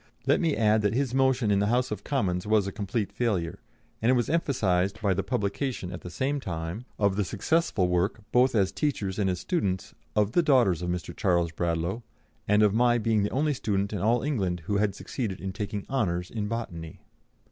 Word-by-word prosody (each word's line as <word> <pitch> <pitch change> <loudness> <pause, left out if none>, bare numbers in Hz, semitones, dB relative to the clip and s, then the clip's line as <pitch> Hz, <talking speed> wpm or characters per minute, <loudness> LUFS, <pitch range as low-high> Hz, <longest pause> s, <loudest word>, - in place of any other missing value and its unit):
Let - - +3
me 165 -4 +2
add 110 -1 +3
that 105 +1 +1
his 130 -2 0
motion 130 -4 +2
in 100 - +3
the 100 - +2
House 125 +3 +1
of - - -4
Commons 100 -9 -1
was 105 -2 +3
a 100 - -3
complete 100 +1 -2
failure, 100 -7 -1 0.4
and 115 - +2
it 130 - +5
was 120 +2 0
emphasised 100 - +1
by 100 -3 +2
the 95 - 0
publication 105 -2 -2
at 90 - -7
the 90 - -7
same 135 +10 -1
time 85 +2 -5
of 100 -2 +1
the 105 - +2
successful 105 - +1
work, 90 +5 0
both 125 0 +4
as 95 -3 +3
teachers 100 -4 -2
and 100 -2 +2
as 90 -1 -1
students, 95 - -2 0.2
of 105 0 +2
the 175 - +4
"daughters 120 - +3
of 90 - -2
Mr. 90 -1 -4
Charles 85 -3 +1
Bradlaugh," 85 +5 -1 0.5
and 105 +1 +4
of 105 -2 +4
my 120 +1 +4
being 110 -2 +1
the 100 - 0
only 150 +3 +1
student 100 -3 -1
in 100 - -2
all 115 +5 +2
England 95 - -1
who 100 +2 0
had 100 -1 +1
succeeded 105 -8 -4
in 95 +2 -4
taking 100 0 -4
honours 90 -10 -1
in 105 -3 -3
botany. 85 -8 -5
105 Hz, 210 wpm, -27 LUFS, 95-120 Hz, 0.5 s, it